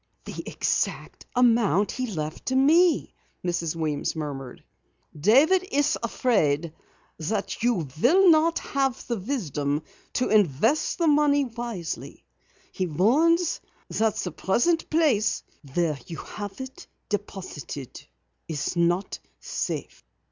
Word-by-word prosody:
"The - - -6
exact - - -2
amount 230 -5 +3
he 255 -1 -3
left 155 -6 -5
to 260 - +1
me!" 320 +6 +4 0.3
Mrs. 170 -2 -1
Weems 155 -2 -2
murmured. 140 -5 -6 0.5
"David 270 - +5
is 290 +1 +2
afraid 170 - +1 0.5
that 195 +6 -2
you 230 -9 +1 0.2
will 360 +8 +6
not 325 +1 +4
have 270 -3 -1
the 235 - -2
wisdom 155 - -2 0.3
to 250 - 0
invest 215 - +2
the 340 - +1
money 290 -2 +4
wisely. 230 - -6 0.5
He 185 - -2
warns 300 - +3 0.3
you - - -3
that 220 -1 +2
the 180 - -3
present 280 - +1
place 300 -10 +2 0.3
where 165 -5 +1
you 165 - -6
have 205 +2 -7
it 260 0 -8 0.2
deposited 185 - -6 0.4
is 160 +1 -3
not 175 +3 +1 0.2
safe. - - -4
215 Hz, 120 wpm, -26 LUFS, 165-275 Hz, 0.5 s, will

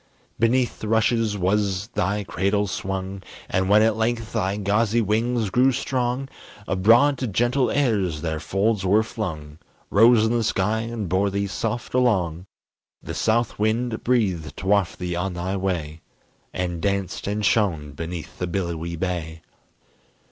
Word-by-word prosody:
Beneath 120 +2 +1
the 110 - -5
rushes 110 -1 +2
was 100 +1 0
they 100 -2 -1
cradle 100 +2 0
swung, 95 0 -4 0.3
And 95 0 0
when 105 +1 +6
at 110 -1 +3
length 115 0 -1
thy 100 -3 0
gauzy 105 +3 +1
wings 115 0 0
grew 130 +4 +4
strong, 130 0 -1 0.4
Abroad 115 +9 +4
to 130 - -1
gentle 120 +6 +1
airs 100 - 0
their 80 -2 -2
folds 100 +4 0
were 100 +4 +3
flung, 80 -9 -6 0.3
Rose 115 +1 +6
in 110 - +1
the 120 -1 +1
sky 105 0 0
and 115 -3 -4
bore 95 +3 +1
thee 100 +1 -1
soft 110 +4 -3
along; 95 -9 +1 0.6
The - - -6
south 115 0 0
wind 110 +2 0
breathed 95 -11 0
to - - -7
waft 100 -2 +2
thee 90 -1 -3
on 90 +1 -2
thy 90 +3 -2
way, 85 -5 -3 0.5
And 90 -2 -3
danced 100 -1 -2
and 105 +1 -1
shone 85 -9 +1
beneath 85 +2 -7
the 90 - -1
billowy 85 -2 -3
bay. 85 -2 -4
100 Hz, 150 wpm, -23 LUFS, 90-115 Hz, 0.6 s, when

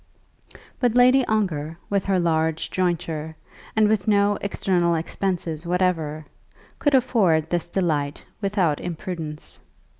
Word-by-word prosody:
But 245 -2 +1
Lady 255 +2 +6
Ongar, 165 -8 -1
with 200 -2 0
her 195 -2 +2
large 160 -1 0
jointure, 165 -3 -2 0.4
and 215 -1 +4
with 210 -2 0
no 205 -1 +3
external 180 -3 +1
expenses 165 -1 -3
whatever, 170 -4 -1 0.5
could 290 -2 +3
afford 190 - +2
this 175 -1 0
delight 155 -6 -1 0.2
without 195 -7 +1
imprudence. 165 -3 -6
175 Hz, 115 wpm, -23 LUFS, 160-200 Hz, 0.5 s, Lady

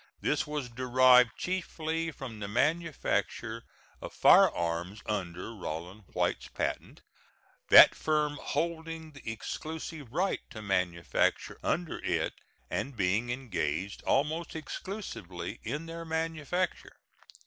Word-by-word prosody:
This - - 0
was 150 -3 -3
derived 125 0 +5
chiefly 165 -3 -2
from 130 -7 -8
the 100 - -4
manufacture 120 -4 0 0.4
of - - -7
firearms 85 +4 +4
under 95 0 -3
Rollin 90 0 -6
White's - - 0
patent, - - -4 0.7
that - - +10
firm 150 -1 0
holding 160 0 -3
the 135 -6 -6
exclusive 155 +3 -6
right 185 +7 +1
to 110 - -8
manufacture 90 -4 0
under 170 -2 -1
it - - 0 0.3
and 135 -3 -3
being 100 +5 +1
engaged 100 - -2
almost 155 +5 +1
exclusively 190 +6 -6
in 150 +8 -4
their 165 0 -6
manufacture. 165 +2 -2
135 Hz, 105 wpm, -30 LUFS, 105-160 Hz, 0.7 s, that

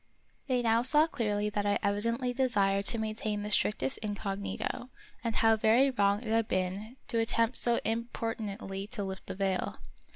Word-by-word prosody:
They 250 -2 +1
now 230 0 +3
saw 295 +5 +6
clearly 210 -8 -1
that 205 0 -1
I 205 - +2
evidently 230 +5 0
desired 200 -6 +1
to 230 - +5
maintain 215 -1 -2
the 210 - -5
strictest 170 -11 +1
incognito, 205 +3 -4 0.3
and 230 -2 -2
how 225 0 +4
very 235 +6 +4
wrong 205 -3 +2
it 225 - -6
had 225 0 +2
been 190 +6 -3
to 230 - 0
attempt 230 +1 +1
so 235 -1 +3
importunately 220 -3 -3
to 215 -2 -4
lift 190 0 -6
the - - -5
veil. 190 -1 -1
220 Hz, 165 wpm, -30 LUFS, 200-235 Hz, 0.3 s, saw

